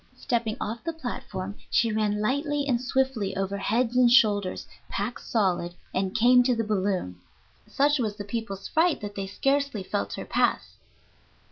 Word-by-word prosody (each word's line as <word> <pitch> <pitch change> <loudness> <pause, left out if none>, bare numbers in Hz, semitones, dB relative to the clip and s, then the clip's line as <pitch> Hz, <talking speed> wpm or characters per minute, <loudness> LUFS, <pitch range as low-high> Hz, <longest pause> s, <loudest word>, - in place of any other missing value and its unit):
Stepping 230 -3 -1
off 225 +2 -4
the 330 - -3
platform, 205 -10 -5 0.2
she 230 -1 +2
ran 210 -1 0
lightly 285 +5 0
and 245 -3 +1
swiftly 255 -6 0
over 195 0 -1
heads 230 +5 0
and 250 -1 +5
shoulders, 205 -6 +3 0.2
packed 210 +5 -3
solid, 180 -5 0 0.2
and 190 0 -1
came 245 +2 +6
to 245 0 +2
the 225 - 0
balloon. 190 - -1 0.5
Such 290 +1 +2
was 215 -4 -1
the 205 - -6
people's 205 -2 -5
fright 325 +1 +2
that 205 -1 -5
they 195 -1 -4
scarcely 275 0 0
felt 100 - -3
her - - -5
pass. - - 0
220 Hz, 160 wpm, -26 LUFS, 195-255 Hz, 0.5 s, came